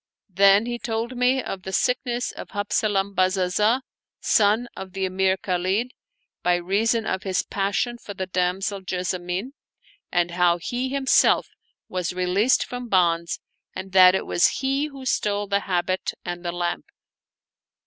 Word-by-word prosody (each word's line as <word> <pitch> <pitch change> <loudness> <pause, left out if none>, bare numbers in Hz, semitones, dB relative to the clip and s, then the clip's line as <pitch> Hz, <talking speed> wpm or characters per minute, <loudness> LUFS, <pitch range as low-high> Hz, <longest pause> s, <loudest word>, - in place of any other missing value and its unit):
Then 200 +3 +5
he 240 0 -4
told 235 0 -3
me 250 +2 +2
of 190 - -5
the 190 - -6
sickness 245 +3 0
of - - -9
Habzalam 205 -1 0
Bazazah, 190 +6 +2 0.4
son 215 +3 +2
of 190 -1 -8
the 195 -1 -1
Emir 190 0 +1
Khalid, 190 +7 -1 0.5
by 180 0 +3
reason 215 +6 0
of 190 - -2
his 190 -2 -1
passion 200 +5 -1
for 205 - -9
the 190 - -3
damsel 185 +2 -1
Jessamine, 180 +4 -3 0.6
and 175 0 +1
how 175 0 +3
he 245 +9 -3
himself 270 0 +3 0.4
was 180 -1 -3
released 185 +7 +2
from 245 -1 -7
bonds, 170 -3 +1 0.4
and 190 0 -6
that 185 0 +7
it - - -2
was 175 - +3 0.2
he 275 +2 +1
who 275 -3 -10
stole 205 -4 0
the 200 0 +1
habit 185 +1 -1
and 175 0 -5
the 175 - -2
lamp. 175 0 -3
195 Hz, 150 wpm, -24 LUFS, 180-230 Hz, 0.6 s, that